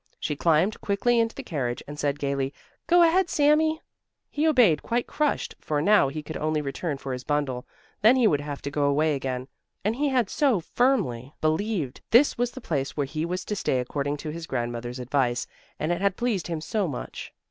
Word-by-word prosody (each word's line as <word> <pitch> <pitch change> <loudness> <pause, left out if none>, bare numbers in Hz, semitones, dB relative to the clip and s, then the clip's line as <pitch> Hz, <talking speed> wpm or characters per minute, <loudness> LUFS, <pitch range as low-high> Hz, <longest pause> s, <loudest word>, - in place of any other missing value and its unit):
She 150 - -2
climbed 170 +7 +2
quickly 230 +4 +2
into 225 0 +1
the - - -6
carriage 125 -7 -3
and 145 +1 -8
said 145 -1 0
gaily: 140 -1 -2 0.3
"Go 350 0 +6
ahead, 350 +2 +3
Sami!" 310 +2 +3 0.5
He 300 +2 +1
obeyed 245 - +5
quite 240 +1 -1
crushed, 300 -1 -1
for 150 -1 -1
now 200 -1 +5
he 150 +3 -5
could 160 +2 -6
only 155 0 0
return 145 +1 -3
for 135 -1 -5
his 125 0 -5
bundle; 140 -4 -1 0.3
then 225 +5 +7
he 255 -3 +3
would 145 -9 +3
have 145 -1 -6
to 140 - -4
go 145 0 +1
away 150 +2 +2
again, 130 -2 -3 0.4
and 215 +2 +1
he 290 +3 +1
had 250 -5 +2
so 265 -2 +2
firmly 165 - 0
believed 155 - -1
this 255 +6 +5
was 245 0 0
the 260 - -9
place 140 -9 -2
where 145 - +1
he 155 +4 -3
was 180 +2 -3
to 210 - -2
stay 130 -9 0
according 140 +3 -2
to 150 +1 -5
his 165 +1 -7
grandmother's 120 +1 -3
advice, 125 -1 0 0.3
and 155 - -1
it 175 +1 -1
had 200 -1 +1
pleased 235 -6 -1
him 165 -3 -3
so 200 +4 -1
much. 135 -5 -6
155 Hz, 205 wpm, -26 LUFS, 140-225 Hz, 0.5 s, then